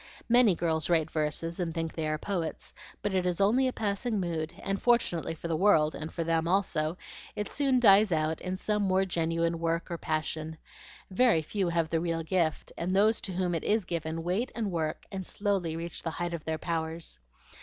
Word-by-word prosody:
"Many 240 -5 +5
girls 160 -2 -1
write 160 -2 +2
verses 160 +2 -2
and 170 -2 -2
think 165 -1 -2
they 160 -2 -2
are 155 0 0
poets; 170 -1 -4 0.3
but 205 - -1
it 185 -1 +2
is 180 0 -1
only 235 +7 +4
a - - 0
passing 215 0 -1
mood, 165 -3 -2
and 195 0 -2
fortunately 225 -10 +2
for 165 - -6
the 165 - 0
world, 155 -4 +4
and 155 +1 -6
for 170 - -2
them 165 0 +1
also, 170 -3 +1 0.4
it 210 - -2
soon 270 -3 +2
dies 205 -3 +6
out 155 0 0
in 185 0 -3
some 210 +1 0
more 190 -1 +2
genuine 165 -1 0
work 165 +1 -1
or 170 - -3
passion. 155 0 -3 0.5
Very 205 -6 +4
few 190 +3 -1
have 165 -1 0
the 165 - +2
real 165 -1 -1
gift, 165 -2 0
and 180 +3 -1
those 215 +3 +4
to 190 - -5
whom 180 -1 0
it 165 - -2
IS 215 -2 +1
given 165 -1 -3
wait 195 +9 -1
and 220 -4 -2
work 160 -3 -2
and 190 -1 -4
slowly 190 -4 -1
reach 170 +1 -5
the 165 - -2
height 175 +1 -3
of 165 -2 -5
their 160 0 -1
powers. 160 - -3
170 Hz, 205 wpm, -29 LUFS, 160-195 Hz, 0.5 s, dies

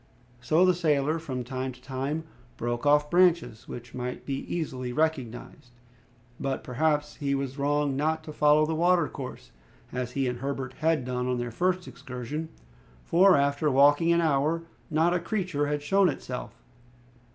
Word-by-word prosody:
So 160 +8 +3
the 185 - +5
sailor 155 -2 +1
from 130 -6 -4
time 130 +1 -4
to 125 - -16
time 135 +4 -3 0.3
broke 120 +3 -2
off 150 0 +4
branches 175 -10 +3
which 120 0 -9
might 125 0 -5
be 135 -1 -2
easily 130 -7 -3
recognized. 130 -3 -3 0.7
But, 135 -1 -2
perhaps, 150 +3 0
he 140 -2 0
was 135 0 -4
wrong 145 0 +1
not 160 +3 0
to 155 - -8
follow 150 +1 +4
the 160 - -2
watercourse, 170 -5 0 0.4
as 125 -1 -4
he 135 -1 0
and 125 -1 -3
Herbert 135 -1 -4
had 155 -4 +1
done 125 0 -2
on 125 -1 0
their 120 0 -3
first 180 +7 0
excursion, 130 +6 -6 0.6
for 185 +2 +5
after 140 +2 +1
walking 145 +5 +5
an 170 0 +4
hour 155 +2 +1 0.3
not 160 +3 +2
a 180 - +1
creature 175 -6 -1
had 145 0 -2
shown 195 +4 +4
itself. 130 -3 -6
145 Hz, 160 wpm, -27 LUFS, 130-160 Hz, 0.7 s, the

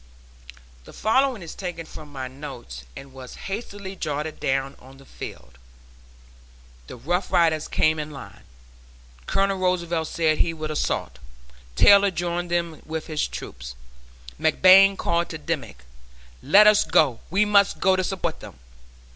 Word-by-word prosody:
The - - -14
following 250 -1 +1
is 165 - -8
taken 175 -4 -6
from 150 -1 -12
my 130 -2 -5
notes 125 - -9
and 135 -1 -11
was 130 -1 -10
hastily 200 -1 -6
jotted 155 -2 -4
down 135 +1 -1
on 135 +1 -16
the 135 - -17
field: 65 - -10 1.3
"The - - -9
Rough 175 +10 -2
Riders 165 -4 +2
came 155 0 +1
in 150 0 -5
line 140 -3 -11 0.9
Colonel 195 0 0
Roosevelt 170 -3 0
said 160 -2 0
he 165 -1 +1
would 155 -1 -5
assault 65 - -2 0.6
Taylor 200 - +6
joined 175 0 -3
them 170 -2 -2
with 160 0 -5
his 155 -2 -2
troop - - -9 0.8
McBlain 190 +5 +6
called 170 0 0
to 160 - -6
Dimmick, 145 - -5 0.6
'let 210 +2 +6
us 210 -1 +6
go, 155 -7 +2
we 200 +4 +2
must 200 -1 +3
go 190 0 +3
to 185 - 0
support 180 -4 -3
them.' 105 -8 -12
165 Hz, 145 wpm, -24 LUFS, 145-185 Hz, 1.3 s, Taylor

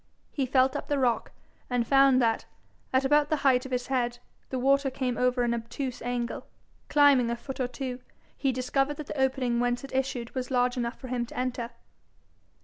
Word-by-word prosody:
He 270 -3 -1
felt 260 0 +3
up - - -4
the 290 - 0
rock, 250 -3 +1 0.4
and 245 -2 +1
found 270 0 +5
that, 230 -2 +1 0.5
at 260 +1 +2
about 295 +1 +3
the 310 - +2
height 255 -1 +4
of - - -14
his 250 -1 -1
head, 245 -2 -1 0.3
the 260 - -2
water 275 +2 +3
came 255 -2 -2
over 250 +1 +1
an 235 0 +1
obtuse 235 +3 -4
angle. 245 0 -3 0.4
Climbing 280 -5 +5
a 235 - 0
foot 265 +3 -8
or 255 - +1
two, 255 -1 -5 0.4
he 270 - 0
discovered 270 +3 0
that 305 - -6
the 275 - -3
opening 260 -3 +1
whence 245 +1 0
it 275 - -9
issued 260 -3 -2
was 255 -1 -3
large 250 -1 +2
enough 240 -1 -3
for 255 - -8
him 240 -1 -1
to - - -11
enter. 250 -2 -2
255 Hz, 200 wpm, -28 LUFS, 245-270 Hz, 0.5 s, found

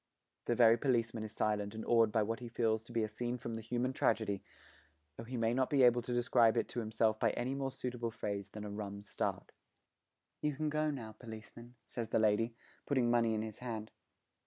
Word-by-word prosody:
The 120 - +1
very 115 -1 +7
policeman 115 -4 +1
is 110 - -6
silent 105 -1 -1
and 110 - -5
awed 115 -2 +4
by 110 0 +3
what 115 +2 -2
he 125 - -7
feels 110 -1 +1
to 120 - -12
be 115 -1 +1
a - - 0
scene 120 +3 -3
from 120 -1 -5
the 115 - -4
human 120 +3 -1
tragedy, 110 -5 +1 0.7
though 115 - -8
he 125 +2 -4
may 115 0 +2
not 130 +1 +1
be 140 -3 +4
able 120 0 +6
to 120 - -6
describe 120 -1 +4
it - - +1
to - - -3
himself 110 -1 +1
by 115 - +3
any 125 +2 -1
more 135 -1 -1
suitable 125 -2 -3
phrase 105 -3 -4
than 105 +1 -7
'a 105 - -5
rum 100 -1 -5
start.' 105 - -3 0.9
'You 150 -2 0
can 155 +2 -1
go 155 0 +1
now, 120 -7 -5
policeman,' 110 +2 -11
says 115 -2 -4
the - - +2
lady, 110 +2 +2 0.3
putting 130 -4 +2
money 115 -2 +3
in 110 - -1
his 110 -1 -7
hand. 110 -3 -5
115 Hz, 215 wpm, -35 LUFS, 110-120 Hz, 0.9 s, very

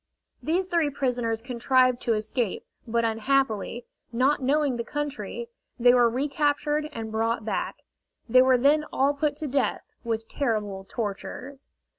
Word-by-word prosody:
These 350 +4 0
three 340 -5 +1
prisoners 245 -5 -1
contrived 255 0 +2
to 230 - +1
escape, 215 0 -2 0.2
but 230 0 +1
unhappily, 230 0 0 0.3
not 265 +5 +2
knowing 280 -1 +1
the 235 - -2
country, 295 - -4 0.3
they 245 +1 +6
were 240 -1 +5
recaptured 295 +3 0
and 225 -4 -6
brought 225 0 -1
back. 220 - -2 0.5
They 255 +2 +6
were 260 0 +5
then 290 +4 +4
all 275 +2 +2
put 290 0 -1
to 300 +1 -4
death, 275 0 -1
with 225 -1 -2
terrible 210 -8 -2
tortures. 250 +5 -5
255 Hz, 140 wpm, -26 LUFS, 230-285 Hz, 0.5 s, they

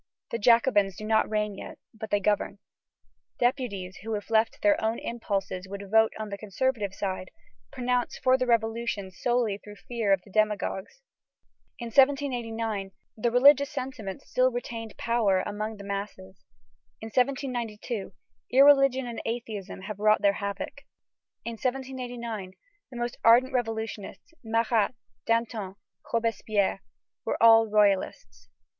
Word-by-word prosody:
The 230 - -2
Jacobins 210 -4 +4
do 215 - -7
not 220 0 +2
reign 210 -1 -1
yet, - - -9 0.2
but 220 -1 -8
they 205 - +2
govern. 205 0 0 0.8
Deputies 240 -8 -1
who, 220 +2 -4
if 205 +2 -7
left 225 0 +3
to - - -22
their 305 -5 +3
own 220 +1 0
impulses, 195 -5 -3
would 200 0 -8
vote 220 0 +5
on 215 -1 -5
the 200 0 -6
conservative 215 0 -1
side, 190 -1 -4 0.4
pronounce 250 -1 -1
for 255 0 +3
the 255 -1 0
Revolution 225 -4 0
solely 225 +1 0
through 210 0 -12
fear 225 -1 -2
of 195 -2 +3
the 200 - -17
demagogues. 215 - -1 0.7
In 235 -1 -6
1789, 230 -7 +1 0.2
the 230 +2 0
religious 280 +3 +6
sentiment 240 -7 -6
still 255 0 +2
retained 230 -2 -6
power 220 -5 +2
among 215 +1 -4
the 200 - -10
masses. 195 -1 -6 0.6
In 220 - -7
1792, 245 -5 -2 0.4
irreligion 275 -1 +5
and 235 -1 -5
atheism 220 -5 -5
have 205 +1 -7
wrought 215 0 +3
their 200 -1 +5
havoc. 200 +7 -5 0.6
In 235 - -3
1789, 245 -6 -4 0.4
the 245 - -9
most 240 0 -3
ardent 240 +3 +6
revolutionists, 225 - -4
Marat, 225 0 +1 0.3
Danton, 230 -4 -1 0.4
Robespierre, 220 -4 0 0.4
were - - -1
all 225 0 +7
royalists. 190 - 0
225 Hz, 135 wpm, -27 LUFS, 200-245 Hz, 0.8 s, all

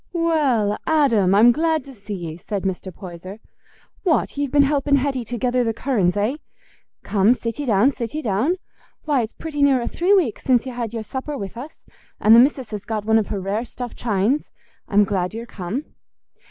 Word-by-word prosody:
"Well, 285 - +1
Adam, 235 -12 +3
I'm 230 +4 +7
glad 315 +2 0
to 275 - -11
see 205 -2 -7
ye," 165 -3 -6
said 195 +2 -4
Mr. 190 0 -3
Poyser. 185 +2 -9 0.6
"What! 345 -6 +1
ye've 285 -1 -1
been 285 +1 +4
helping 280 0 +2
Hetty 270 -2 0
to 240 +2 -4
gether 250 +1 +1
the 225 -2 -1
curran's, 205 -9 0
eh? 220 +8 0 0.7
Come, 210 +4 +3
sit 230 +1 -5
ye 290 - -3
down, 225 +5 +4
sit 235 +1 -5
ye 310 - -3
down. 225 - +1 0.5
Why, 290 -4 +1
it's 225 0 -5
pretty 305 -3 -5
near 275 -2 +4
a 235 - -3
three 370 +4 +2
week 315 - +1
since 250 -2 +2
y' 260 - -5
had 240 -3 -4
your 225 -1 -4
supper 270 +5 -5
with 200 +1 -6
us; 270 +7 -9 0.4
and 220 +2 +6
the - - +9
missis 260 -2 +2
has 210 -2 -5
got 215 -2 -4
one 220 0 +4
of 215 - -2
her 205 - -3
rare 200 +4 -2
stuffed 245 0 -7
chines. 225 +5 0 0.4
I'm 210 -2 +4
glad 190 0 -2
ye're 230 +1 -5
come." 215 +6 -5
235 Hz, 205 wpm, -21 LUFS, 205-280 Hz, 0.7 s, the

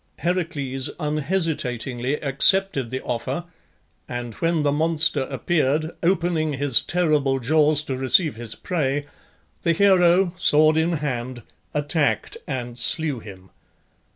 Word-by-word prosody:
Heracles 155 -7 -2
unhesitatingly 145 -5 -2
accepted 145 -1 +3
the 130 +2 -5
offer, 130 +7 -3 0.7
and 120 -1 -5
when 165 +4 -1
the 145 - +1
monster 155 -2 +1
appeared, 155 +2 -1
opening 170 -3 0
his 140 -2 +2
terrible 150 -6 0
jaws 150 +3 +2
to 135 -3 -4
receive 130 +4 +3
his 115 -1 -4
prey, 145 -5 -2 0.6
the 170 - +1
hero, 180 -1 +3
sword 155 -3 +4
in 160 +2 +1
hand, 130 -5 -4 0.3
attacked 150 +1 -1
and 125 -3 -5
slew 155 -6 +3
him. 95 -3 -13
150 Hz, 115 wpm, -22 LUFS, 130-165 Hz, 0.7 s, sword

